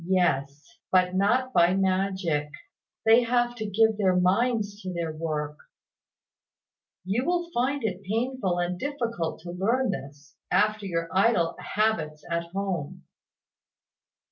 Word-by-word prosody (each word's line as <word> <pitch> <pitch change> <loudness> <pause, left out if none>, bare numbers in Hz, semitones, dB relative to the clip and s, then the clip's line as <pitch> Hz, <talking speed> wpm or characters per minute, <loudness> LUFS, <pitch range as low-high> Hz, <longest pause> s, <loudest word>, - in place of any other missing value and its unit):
"Yes; 150 -6 0
but 185 -1 +3
not 245 +7 +2
by 175 +1 +4
magic. 190 -5 0 0.6
They 225 +2 +7
have 240 0 +1
to 220 -2 -3
give 220 +1 +3
their 190 -3 +3
minds 205 +3 +1
to 185 - -5
their 170 -3 -3
work. 150 -2 -3 1.5
You 210 +7 0
will 345 +2 -1
find 265 +3 0
it 195 -3 -2
painful 220 -1 -1
and 175 0 -1
difficult 235 - -3
to 175 +1 -7
learn 225 +7 +1
this, 140 -4 -8 0.2
after 215 -1 +2
your 165 -2 -2
idle 190 -4 +2
habits 165 -9 -1
at 170 0 0
home. 180 -4 -4
190 Hz, 125 wpm, -26 LUFS, 170-225 Hz, 1.5 s, They